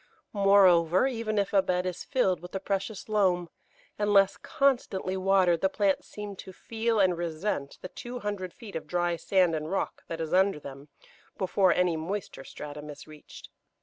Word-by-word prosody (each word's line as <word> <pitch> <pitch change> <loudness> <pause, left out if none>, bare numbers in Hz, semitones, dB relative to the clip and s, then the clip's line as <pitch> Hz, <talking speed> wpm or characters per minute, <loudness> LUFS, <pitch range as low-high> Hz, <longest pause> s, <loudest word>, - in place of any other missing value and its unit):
Moreover, 190 -2 +5
even 230 -5 -2
if 200 0 0
a 195 - +5
bed 180 -1 -1
is 180 -1 -4
filled 190 - +1
with 180 +2 -11
the 195 - -2
precious 195 +2 -3
loam, 185 -5 +1 0.5
unless 200 -2 +4
constantly 245 -10 0
watered 185 -3 +3
the 190 - +3
plants 195 -1 0
seem 210 -1 -7
to 190 - -9
feel 225 +3 -2
and 185 -3 +4
resent 165 -3 -3
the - - -4
two 245 +6 -8
hundred 200 -3 -4
feet 225 -3 -12
of 160 -1 -5
dry 175 +1 0
sand 180 0 +2
and 155 0 -3
rock 195 - -2
that 165 - -5
is 160 -1 -3
under 190 -3 +3
them 140 0 -10 0.5
before 190 0 +2
any 180 -2 +2
moister 175 -2 -5
stratum 150 +2 -9
is 145 -1 -10
reached. 155 -1 -13
190 Hz, 175 wpm, -28 LUFS, 170-205 Hz, 0.5 s, Moreover